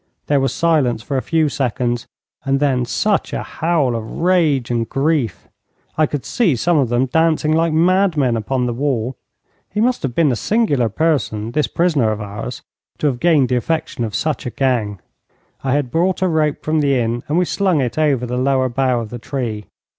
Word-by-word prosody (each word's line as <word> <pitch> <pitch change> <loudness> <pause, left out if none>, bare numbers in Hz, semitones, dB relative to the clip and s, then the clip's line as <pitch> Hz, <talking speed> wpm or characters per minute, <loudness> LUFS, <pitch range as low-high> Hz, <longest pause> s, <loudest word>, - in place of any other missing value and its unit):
There 145 -1 +2
was 135 0 0
silence 140 -9 +1
for 140 - -4
a 130 - +1
few 160 +1 +1
seconds, 125 -3 -2 0.4
and 135 0 +1
then 130 -4 +1
such 205 - 0
a - - -2
howl 160 -7 0
of 110 -1 -5
rage 160 -9 +2
and 115 -1 -1
grief! 135 - -1 0.5
I 155 -1 +3
could 145 -3 -4
see 190 - +1
some 170 +8 +1
of 130 -4 +1
them 120 +2 +2
dancing 155 +2 +2
like 165 +1 +2
mad 180 +2 +3
men 130 -5 +2
upon 125 +3 -1
the 120 - -1
wall. 130 -2 -1 0.5
He 210 - -3
must 245 +3 +1
have 130 -4 -3
been 155 -5 +3
a - - 0
singular 145 - +1
person, 115 -6 -1
this 150 +4 +1
prisoner 155 -10 +1
of 110 - -3
ours, 105 +4 -6 0.3
to - - -3
have 130 -4 +1
gained 155 -6 +3
the 125 - +2
affection 160 -2 -2
of 110 -2 -3
such 155 -5 -2
a - - -1
gang. 120 -6 -1 0.6
I 130 -1 0
had 140 -4 0
brought 185 +4 +1
a - - +3
rope 155 -3 0
from 155 0 +1
the 140 -2 +2
inn, 120 0 -1
and 150 - 0
we 180 - +3
slung 185 -3 +1
it 125 -3 -1
over 140 -5 +2
the 125 +1 -3
lower 130 0 +1
bough 125 -1 +1
of 110 -2 -8
the 120 - -6
tree. 115 -5 -4
135 Hz, 205 wpm, -19 LUFS, 120-160 Hz, 0.6 s, I